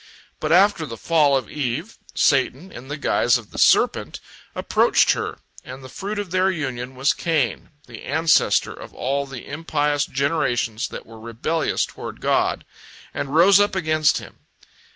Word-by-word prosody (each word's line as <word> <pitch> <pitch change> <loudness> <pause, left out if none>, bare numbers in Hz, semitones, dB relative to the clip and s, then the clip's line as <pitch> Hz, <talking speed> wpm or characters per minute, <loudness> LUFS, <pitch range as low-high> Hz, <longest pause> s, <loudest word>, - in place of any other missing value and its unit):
But 155 - -2
after 180 -2 +4
the 115 - -8
fall 150 -1 +3
of 130 - -4
Eve, 150 - -4 0.2
Satan, 140 +5 +1
in 125 +2 -11
the 145 +2 -5
guise 120 -4 +2
of 115 -4 -13
the - - -7
serpent, - - +2 0.4
approached - - +3
her, - - -3 0.3
and 130 +1 -10
the 130 - -10
fruit 205 +2 -5
of 205 -4 -4
their 185 +1 +2
union 130 -7 -4
was 135 +3 +2
Cain, 155 - -1 0.2
the 120 -2 -11
ancestor 160 +2 +2
of - - -12
all 140 +2 -2
the 135 -3 -9
impious 145 -1 -1
generations 130 -5 -1
that - - -9
were 115 0 -13
rebellious 115 +8 -1
toward - - -9
God, - - 0 0.5
and 140 +2 -4
rose 190 +4 +6
up 205 -1 +2
against 155 -4 +2
Him. - - -11
145 Hz, 160 wpm, -22 LUFS, 130-165 Hz, 0.5 s, rose